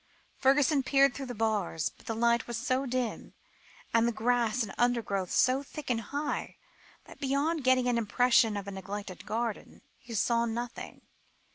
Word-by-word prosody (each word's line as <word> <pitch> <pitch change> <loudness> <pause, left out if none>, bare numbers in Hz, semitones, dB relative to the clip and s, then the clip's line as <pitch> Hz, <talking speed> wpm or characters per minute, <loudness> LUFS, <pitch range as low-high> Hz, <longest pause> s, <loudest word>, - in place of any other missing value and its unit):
Fergusson 275 +2 +4
peered 275 0 +4
through 270 -2 -6
the 245 - -6
bars, 210 -7 0
but - - -21
the 225 - -2
light 235 +1 +2
was 240 -1 -3
so 255 +3 0
dim, 250 -2 -3 0.6
and 230 0 +4
the - - +2
grass 240 +1 +1
and 200 - -6
undergrowth 225 -6 0
so 255 +2 +3
thick 285 -1 -6
and 230 -2 0
high, 285 +5 -3 0.5
that - - -14
beyond 285 +3 0
getting 255 -1 +3
an 240 -1 +2
impression 230 -1 +3
of 200 0 -6
a - - -4
neglected 195 -1 -7
garden, 230 0 -4 0.2
he 235 -2 -8
saw 235 +2 +2
nothing. 235 +1 -6
240 Hz, 165 wpm, -30 LUFS, 220-255 Hz, 0.6 s, Fergusson